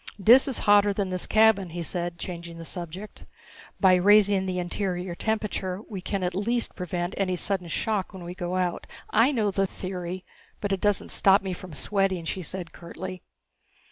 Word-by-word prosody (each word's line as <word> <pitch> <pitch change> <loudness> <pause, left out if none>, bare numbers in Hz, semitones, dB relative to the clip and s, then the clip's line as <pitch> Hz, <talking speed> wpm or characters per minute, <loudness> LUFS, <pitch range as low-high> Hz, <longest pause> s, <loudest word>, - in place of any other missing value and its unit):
"Dis 240 +8 +7
is 265 - 0
hotter 205 0 +5
than 195 -2 -2
this 185 -1 -2
cabin," 215 -4 +4
he 170 +1 -5
said, 175 +1 -3
changing 170 -1 -7
the 165 - -8
subject. 180 +4 -8 0.5
"By 190 -2 +6
raising 200 +1 +5
the 185 -1 -2
interior 180 0 -2
temperature 200 -2 -2
we 195 -4 -6
can 195 +1 -2
at 180 0 -1
least 230 +5 0
prevent 175 0 -3
any 185 -2 0
sudden 180 0 -1
shock 205 +3 -1
when 190 -3 -9
we 175 +1 -6
go 180 0 -3
out 180 -2 -1 0.2
" - - -31 0.2
"I - - +1
know 215 -7 +1
the 195 0 +1
theory 185 -1 -6 0.3
but 205 - -2
it 195 - -2
doesn't 205 -2 +1
stop 195 0 +4
me 190 -1 -3
from 180 -1 -9
sweating," 190 +1 0
she 185 - -3
said 175 0 -6
curtly. 180 +1 -8
185 Hz, 185 wpm, -26 LUFS, 175-200 Hz, 0.5 s, Dis